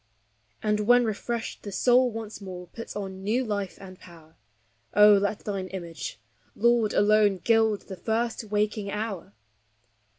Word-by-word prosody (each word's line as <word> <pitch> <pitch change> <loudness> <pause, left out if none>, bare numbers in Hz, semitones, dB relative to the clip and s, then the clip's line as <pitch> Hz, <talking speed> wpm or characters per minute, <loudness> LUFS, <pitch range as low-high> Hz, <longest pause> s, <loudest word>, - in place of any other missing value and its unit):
And 210 0 +1
when 245 +3 +4
refreshed 225 +2 -4
the 205 - -7
soul 250 +5 +4
once 220 -2 -7
more 180 -2 -8
puts 230 +6 -9
on 190 -2 -5
new 235 +6 0
life 200 -4 -3
and 185 -1 -11
power; 165 -3 -16 0.6
Oh, 210 0 +8
let 205 +1 +1
thine 195 -3 -3
image, 170 -4 -7 0.4
Lord, 235 -1 +2
alone, 205 -1 +4
gild 220 +1 +2
the 190 - -9
first 230 +2 -2
waking 210 0 -1
hour! 210 - -4
210 Hz, 140 wpm, -26 LUFS, 195-225 Hz, 0.6 s, Oh